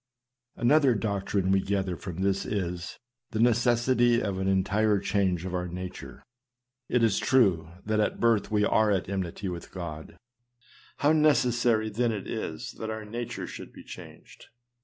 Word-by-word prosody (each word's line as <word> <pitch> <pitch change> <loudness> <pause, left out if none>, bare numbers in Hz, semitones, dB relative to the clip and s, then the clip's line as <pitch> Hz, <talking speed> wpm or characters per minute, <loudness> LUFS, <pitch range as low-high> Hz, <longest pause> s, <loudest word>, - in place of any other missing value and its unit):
Another 135 +1 +4
doctrine 100 -2 -1
we 95 - +4
gather 95 -2 -1
from 90 +1 -5
this 95 0 +1
is, 90 -4 -4 0.3
the 110 - -3
necessity 120 +1 +3
of 100 -3 -2
an 95 - -1
entire 100 +2 +2
change 95 -3 0
of 95 - -4
our 90 0 -2
nature. 90 +1 -8 0.7
It 125 -2 +2
is 110 -4 +3
true, 95 -11 +3 0.2
that 110 0 0
by 105 - +1
birth 115 -3 +2
we 105 -1 +2
are 110 +1 +3
at 95 -3 0
enmity 95 0 -3
with 90 -2 -6
God. 80 -4 -7 0.8
How 145 - +3
necessary 120 -7 +3
then 120 +2 +1
it 105 -3 -4
is - - -4
that 110 - -4
our 110 0 -5
nature 120 +2 -5
should - - -9
be - - -13
changed - - -12
105 Hz, 160 wpm, -28 LUFS, 95-115 Hz, 0.8 s, Another